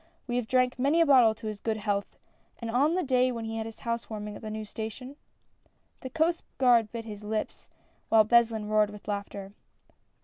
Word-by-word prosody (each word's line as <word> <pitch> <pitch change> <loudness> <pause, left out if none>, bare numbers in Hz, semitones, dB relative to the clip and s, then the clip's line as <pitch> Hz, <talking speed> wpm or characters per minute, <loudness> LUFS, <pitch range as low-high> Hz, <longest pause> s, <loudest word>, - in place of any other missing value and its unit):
We 245 -1 -2
have 245 -3 -2
drank 255 0 +2
many 285 +6 +3
a 335 - +6
bottle 250 -7 +6
to 220 - -12
his 215 -1 -4
good 220 0 -2
health, 205 -1 -2 0.4
on 250 +8 +1
the 370 - 0
day 255 -1 +2
when 230 -2 -5
he 225 0 -4
had 220 0 -3
his 225 - -11
house 235 0 -3
warming 210 -1 -6
at - - -10
the 220 - -6
new 215 0 -5
station! 225 +6 -7 0.4
" - - -41
The 260 - -6
Coast 325 +4 +1 0.2
Guard 240 -4 +4
bit 230 -1 -6
his 210 -2 -8
lips, 215 +1 -4 0.4
while 220 -1 +6
Beslin 225 -2 +3
roared 215 -1 +3
with 210 -1 -12
laughter. 200 -1 -5
225 Hz, 205 wpm, -28 LUFS, 215-250 Hz, 0.4 s, a